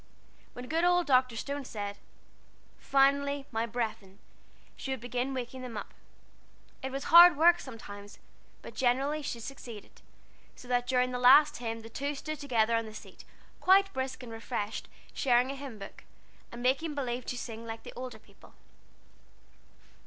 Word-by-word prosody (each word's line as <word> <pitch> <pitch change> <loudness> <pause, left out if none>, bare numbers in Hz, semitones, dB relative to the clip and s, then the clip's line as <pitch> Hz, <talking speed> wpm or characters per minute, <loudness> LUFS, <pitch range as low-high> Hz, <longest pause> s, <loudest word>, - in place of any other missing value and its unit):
When 245 0 -8
good 325 +4 0
old 355 0 +4
Dr. 255 -4 +3
Stone 280 +4 -4
said, 205 -3 -5 0.8
"Finally, 280 +1 +2
my 225 0 -1
brethren," 220 -4 -4 0.6
she - - -7
would 265 -1 -2
begin 245 +3 -2
waking 255 0 -5
them 245 -4 -7
up. 205 - -7 0.9
It 265 - -4
was 275 +1 -4
hard 345 -2 +10
work 345 +2 +6
sometimes, 205 -5 -10 0.5
but - - -9
generally 270 +4 +1
she 245 -4 -4
succeeded, 230 -3 -10 0.5
so 250 - -13
that 245 0 +1
during 250 0 +2
the 250 - -3
last 290 +4 +7
hymn 230 -1 -4
the 225 - -10
two 280 +6 -3
stood 310 +1 -5
together 235 -5 +1
on 230 -1 -1
the 215 - -10
seat, - - -12 0.3
quite 390 +1 +4
brisk 260 0 -4
and 235 - -9
refreshed, 225 -2 -4 0.3
sharing 250 -1 +2
a - - -5
hymn 270 -5 -8
book, 195 -1 -10 0.5
and 240 +1 -8
making 290 +5 +1
believe 250 -3 -3
to 245 - -3
sing 230 -1 -7
like 225 0 -7
the - - -10
older 250 -2 -7
people. - - -20
250 Hz, 160 wpm, -30 LUFS, 230-280 Hz, 0.9 s, hard